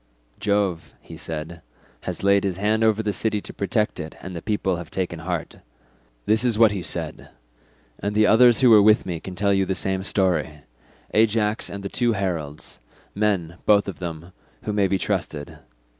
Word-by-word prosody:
'Jove,' 100 -8 -1
he 80 +7 -12
said, 80 +1 -6 0.4
'has - - -4
laid 100 0 +4
his 95 -3 -1
hand 105 +3 +1
over 110 0 +2
the 105 -1 -1
city 110 0 -1
to - - -10
protect 105 +1 -1
it, 80 -1 -6
and 95 0 -8
the 85 - -5
people 95 -3 -1
have 85 -1 -8
taken 90 -3 -3
heart.' 85 -1 -4 0.7
This 110 +2 +3
is 120 -4 +1
what 110 -2 +6
he 100 -3 -3
said, - - -6 0.7
and 105 +1 -3
the 110 0 +5
others 120 +3 +6
who 125 -2 +6
were 105 -2 +8
with 110 +1 +5
me 85 -3 -3
can 90 +2 -8
tell 100 +2 +2
you 95 0 +2
the 95 0 -1
same 95 +1 -1
story—Ajax 95 - -1
and 100 0 -7
the - - -2
two 120 +3 +1
heralds, 85 -7 -4 0.3
men, 95 -5 -1
both 105 -1 +5
of 95 - -6
them, 85 -1 -6 0.3
who 105 - -2
may 100 -2 +2
be 95 +1 +1
trusted. 75 -5 -3
100 Hz, 185 wpm, -23 LUFS, 85-105 Hz, 0.7 s, were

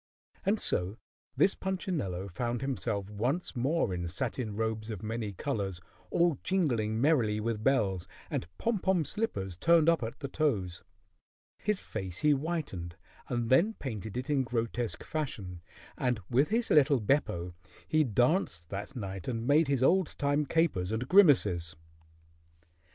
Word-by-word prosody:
And 210 +2 +3
so 90 +5 +1 0.4
this 195 - +5
Punchinello 155 - -3
found 120 +6 -3
himself 115 -7 -2
once 125 - -2
more 130 - +1
in 85 -1 -3
satin 110 +3 -3
robes 110 0 -2
of 105 -2 -5
many 110 -1 -3
colors, 100 -5 -3 0.3
all 170 -5 +2
jingling 120 - 0
merrily 120 -7 +3
with 110 -1 -2
bells, 100 -10 +1 0.2
and - - -3
pom 230 -3 0
pom 180 -4 +1
slippers 100 - -3
turned 165 - +4
up 165 -3 +4
at 115 0 -5
the 140 - -4
toes. 105 - -1 0.8
His 210 -2 0
face 95 -5 -5
he 150 - +3
whitened 140 - -2 0.3
and 120 -1 -2
then 200 +12 +4
painted 110 -4 -5
it 125 - -3
in 145 -2 +2
grotesque 120 -1 -2
fashion, 100 - -4 0.3
and 125 -3 0
with 135 +5 +3
his 230 +2 0
little 145 -2 +5
Beppo 100 - 0 0.3
he 155 -1 +3
danced 120 - +1
that 100 +5 -6
night 95 -5 -5
and 115 -2 -2
made 150 +3 +4
his 135 -2 +1
old 180 +3 +3
time 145 +1 +1
capers 120 - +1
and 115 +3 -2
grimaces. 105 - +4
120 Hz, 145 wpm, -30 LUFS, 100-150 Hz, 0.8 s, this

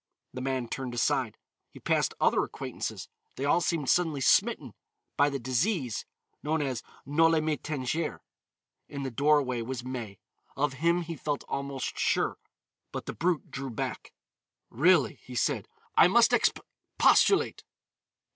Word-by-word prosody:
The 130 - -5
man 130 -2 -2
turned 125 0 -5
aside. 120 - 0 0.3
He - - -14
passed - - 0
other - - +3
acquaintances. - - -5 0.3
They 135 - -3
all 160 +4 +3
seemed 165 -5 -1
suddenly 160 -3 +2
smitten 130 - +2 0.4
by 145 +1 +4
the 140 - -2
disease 130 - -1 0.4
known 155 +2 0
as 130 -4 -2 0.2
Noli 165 +3 +3
me 155 0 0
tangere. 150 +2 -3 0.7
In 140 -1 -5
the 135 - -3
doorway 140 -2 +2
was 120 +1 -5
May. 120 -6 -6 0.4
Of 140 0 +1
him 170 +1 +2
he 165 0 -6
felt 145 0 -3
almost 140 -1 -4
sure, - - +1 0.5
but - - -5
the - - -5
brute 175 -1 -1
drew 135 0 -5
back. 115 - -5 0.6
"Really," 165 +3 +3
he 125 - -10
said, 120 - 0 0.3
"I - - +7
must - - +5
exp - - +3 0.4
postulate." - - +4
140 Hz, 145 wpm, -29 LUFS, 130-160 Hz, 0.7 s, I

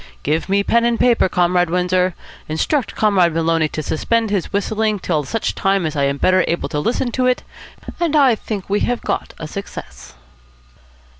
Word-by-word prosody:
Give 155 +5 -1
me 200 +1 +2
pen 235 +3 +2
and 235 -1 +1
paper, 235 -6 +3
Comrade 180 -1 +2
Windsor, 180 +1 +1 0.3
instruct 245 - -1
Comrade 185 -6 +3
Maloney 165 -1 +2
to 155 0 -5
suspend 225 +9 0
his 195 -4 -1
whistling 215 +1 0
till 160 -5 -1
such 225 +10 -2
time 195 -2 +1
as 155 -1 -3
I 140 -1 +1
am 140 0 0
better 185 +4 +3
able 170 - -1
to 150 - -2
listen 240 - -1
to 255 +1 +1
it; 250 - +1 0.6
and 335 -3 0
I 275 -5 +5
think 210 -3 -5
we 205 +1 +1
have 245 -1 -1
got - - -3
a 160 - -6
success." 65 - -9
185 Hz, 180 wpm, -19 LUFS, 165-225 Hz, 0.6 s, I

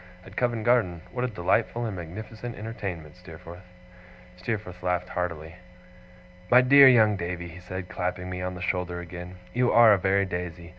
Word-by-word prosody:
'At - - -13
Covent 120 -3 0
Garden. 105 -9 +2
What 125 0 -2
a - - 0
delightful 115 +3 0
and 110 -4 -4
magnificent 110 +7 -8
entertainment, 95 -8 -6
Steerforth!' 90 0 -12 0.7
Steerforth 90 -1 -5
laughed 90 0 -1
heartily. 85 -2 -4 0.9
'My 125 +1 +7
dear 140 +2 +8
young 110 -4 +5
Davy,' 85 0 -5
he 85 +2 -11
said, 90 +1 -7
clapping 90 0 -4
me 90 0 -5
on 90 0 -4
the 90 - -7
shoulder 90 -1 -2
again, 90 +1 -8 0.2
'you 125 0 +2
are 115 -2 +7
a 100 - +2
very 100 +1 +2
Daisy. 90 -2 -6
90 Hz, 165 wpm, -26 LUFS, 90-110 Hz, 0.9 s, dear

